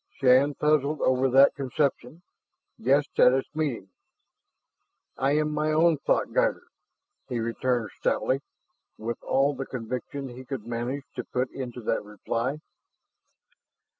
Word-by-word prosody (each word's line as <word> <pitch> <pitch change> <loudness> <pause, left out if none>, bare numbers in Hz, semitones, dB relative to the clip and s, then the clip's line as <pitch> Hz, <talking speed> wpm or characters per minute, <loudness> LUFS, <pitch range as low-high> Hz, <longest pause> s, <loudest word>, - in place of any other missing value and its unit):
Shann 135 +2 +5
puzzled 150 0 +1
over 130 +1 +2
that 135 +2 +6
conception, 140 +3 -2 0.6
guessed 140 +5 +1
at 125 - +7
its 135 0 -1
meaning. 140 -11 -2 1.3
"I 135 +2 +1
am 150 0 +1
my 150 +1 0
own 160 0 +3
thoughtguider," - - +1 0.7
he 125 -2 -2
returned 115 -1 -1
stoutly, 135 +1 0 0.6
with 115 +1 -5
all 140 +2 +2
the 135 0 -5
conviction 130 +3 -5
he 125 +1 -10
could 130 -4 -6
manage 120 +4 -3
to 125 - -2
put 125 +2 -2
into 125 -2 -6
that 110 0 -1
reply. 115 +7 -3
130 Hz, 125 wpm, -27 LUFS, 120-145 Hz, 1.3 s, at